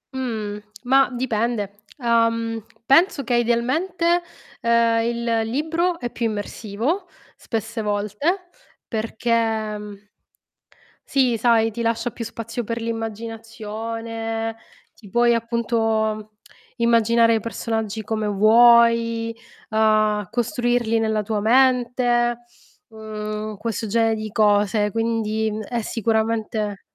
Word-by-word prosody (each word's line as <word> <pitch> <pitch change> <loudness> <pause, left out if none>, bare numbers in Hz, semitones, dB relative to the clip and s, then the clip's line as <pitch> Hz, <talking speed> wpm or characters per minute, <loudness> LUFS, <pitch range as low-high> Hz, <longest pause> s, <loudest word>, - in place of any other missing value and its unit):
Mhmm, 215 -5 -3 0.2
mah, 270 +1 +4
dipende. 235 -4 -1 0.3
Uhm, 230 -2 +1 0.3
penso 290 +1 +4
che 245 - 0
idealmente, 315 +10 +1 0.4
uhm, 235 -1 +3
il 235 +1 -2 0.3
libro 330 +7 0
è 240 -1 -4
più 235 - -1
immersivo 225 - -3 0.3
spesse 225 0 -4
volte 210 - -1 0.4
perché, 230 +1 -3 0.5
mhmm 205 0 -11 1.0
sì, 255 -4 +2
sai, 225 -1 +3
ti 235 +2 -4
lascia 230 +1 0
più 230 - -6
spazio 230 +1 -5
per 230 +2 -3
l'immaginazione, 225 0 -4 0.4
ti 210 - -16
puoi 240 +3 +3
appunto 225 -2 -1 0.5
immaginare 230 0 +4
i 220 - +1
personaggi 220 -1 -3
come 215 0 -2
vuoi, 230 +2 +5 0.4
uhm, 215 -1 +2
costruirli 240 0 0
nella 220 -1 0
tua 210 +1 -2
mente, 245 0 +3 0.5
mhmm, 215 -1 -5
questo 225 +1 -3
genere 225 +1 +2
di 215 -1 -6
cose. 210 0 +2
Quindi, 220 0 -1
mhmm, 215 +1 -4
è 235 +3 -3
sicuramente 220 -2 -1
230 Hz, 105 wpm, -22 LUFS, 215-235 Hz, 1.0 s, vuoi